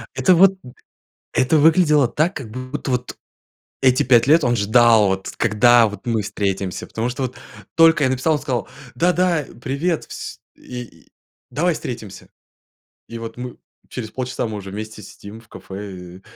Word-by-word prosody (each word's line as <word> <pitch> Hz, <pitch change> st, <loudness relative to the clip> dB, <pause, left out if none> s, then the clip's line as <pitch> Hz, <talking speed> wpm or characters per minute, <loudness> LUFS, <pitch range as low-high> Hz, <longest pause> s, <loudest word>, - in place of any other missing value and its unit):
Это 185 Hz, -, +4 dB
вот, 190 Hz, +2 st, +5 dB
м, 125 Hz, -, -12 dB, 0.6 s
это 130 Hz, +5 st, +2 dB
выглядело 150 Hz, -3 st, +4 dB
так, 155 Hz, +9 st, 0 dB
как 125 Hz, -6 st, -7 dB
будто, 130 Hz, +4 st, -6 dB
вот 125 Hz, 0 st, -2 dB, 0.7 s
эти 130 Hz, -1 st, +4 dB
5 120 Hz, -1 st, +4 dB
лет 155 Hz, +2 st, +5 dB
он 120 Hz, -1 st, +2 dB
ждал, 110 Hz, 0 st, +4 dB
вот 95 Hz, 0 st, -2 dB
когда, 115 Hz, +1 st, +4 dB
вот 105 Hz, +5 st, -9 dB
мы 115 Hz, -2 st, 0 dB
встретимся. 100 Hz, -2 st, -3 dB
Потому 115 Hz, +2 st, -3 dB
что, 125 Hz, +2 st, -4 dB
вот 130 Hz, -1 st, -4 dB, 0.4 s
только 165 Hz, -2 st, +5 dB
я 130 Hz, -, +3 dB
написал, 130 Hz, +5 st, +1 dB
он 150 Hz, -, 0 dB
сказал: 125 Hz, -4 st, -3 dB, 0.3 s
"Да-да, 175 Hz, -3 st, +1 dB, 0.2 s
привет, 150 Hz, +6 st, -2 dB
вс -, -, -8 dB, 0.2 s
и. 125 Hz, -9 st, -10 dB, 0.4 s
Давай 170 Hz, +7 st, 0 dB
встретимся!" 110 Hz, -9 st, -8 dB, 0.8 s
И 115 Hz, -, -7 dB
вот 115 Hz, 0 st, -8 dB
мы 125 Hz, -1 st, -7 dB, 0.3 s
через 110 Hz, -4 st, -6 dB
полчаса 125 Hz, -1 st, -3 dB
мы 110 Hz, -1 st, -5 dB
уже 100 Hz, -1 st, -8 dB
вместе 110 Hz, +1 st, -7 dB
сидим 100 Hz, +3 st, -11 dB
в 115 Hz, -, -21 dB
кафе, 95 Hz, -3 st, -9 dB
125 Hz, 160 wpm, -20 LUFS, 110-145 Hz, 0.8 s, вот